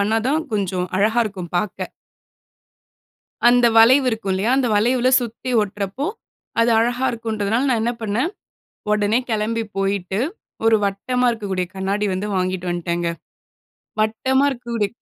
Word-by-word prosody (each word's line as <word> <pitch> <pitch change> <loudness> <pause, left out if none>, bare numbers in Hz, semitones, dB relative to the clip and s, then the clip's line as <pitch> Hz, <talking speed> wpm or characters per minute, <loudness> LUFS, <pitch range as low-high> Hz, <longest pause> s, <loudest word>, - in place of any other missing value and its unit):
பண்ணாதான் 225 +9 +1
கொஞ்சம் 185 -3 -1
அழகாக 220 +4 +3
இருக்கும் 185 -5 -6
பாக்க. 190 +2 -2 1.6
அந்த 245 0 +4
வளைவு 255 +4 +7
இருக்கும் 220 -4 -3
இல்லயா? 195 +6 0
அந்த 260 -3 +2
வளைவுல 245 +4 +3
சுத்தி 240 +2 -5
ஒட்டுறப்போ, 205 +6 -3 0.5
அது 230 +1 +4
அழகாக 245 +3 +1
இருக்கும்ன்றதனால 225 +2 -1
நான் 235 -3 +1
என்ன 240 +1 0
பண்ணேன், 225 - -1 0.6
உடனே 210 +2 +2
கிளம்பி 225 +1 0 0.2
போயிட்டு 195 0 -1 0.5
ஒரு 225 - +6
வட்டமா 250 +6 0
இருக்கக்கூடிய 195 -5 -2
கண்ணாடி 200 +2 -1
வந்து 195 +3 -3
வாங்கிட்டு 185 -1 -1
வந்துட்டேன்ங்க. 175 0 -1 0.9
வட்டமா 260 +5 +2
இருக்க 245 -2 -8
கூடிய 210 -3 0
215 Hz, 130 wpm, -21 LUFS, 195-240 Hz, 1.6 s, வளைவு